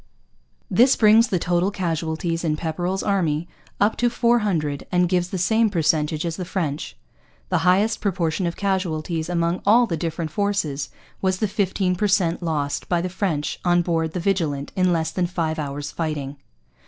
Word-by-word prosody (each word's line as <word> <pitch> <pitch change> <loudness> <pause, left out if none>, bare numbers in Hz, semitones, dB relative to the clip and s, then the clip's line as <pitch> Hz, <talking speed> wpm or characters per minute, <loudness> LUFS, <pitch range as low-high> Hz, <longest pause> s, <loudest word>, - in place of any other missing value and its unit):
This 255 +3 +4
brings 220 +2 +5
the 185 - 0
total 175 +2 +1
casualties 165 -2 -2
in 155 -2 0
Pepperrell's 175 +4 -2
army 170 -5 0 0.3
up 205 +2 +3
to 240 - +2
four 235 0 +2
hundred 155 -9 -2
and 180 0 +3
gives 180 0 0
the 190 - -3
same 220 +5 +2
percentage 155 -3 +1
as 165 -1 -3
the 185 - -3
French. 160 -5 -3 0.5
The - - +2
highest 200 +5 +2
proportion 175 -2 0
of 170 - -3
casualties 170 -4 -2
among 170 0 0
all 230 +4 +5
the 170 -7 -3
different 165 -1 -3
forces 160 - -1 0.3
was 190 -1 +1
the 215 - 0
fifteen 190 -2 0
per 210 +4 +1
cent 185 -4 +1
lost 150 -4 -2
by 175 - +2
the 180 +2 -2
French 180 -6 -2
on 175 -1 +3
board 165 -2 -1
the 180 - -2
Vigilant 165 -7 -1
in 185 -1 +2
less 160 -1 0
than 180 0 0
five 165 -3 -2
hours' 145 0 -4
fighting. 145 -4 -4
175 Hz, 175 wpm, -23 LUFS, 160-195 Hz, 0.5 s, brings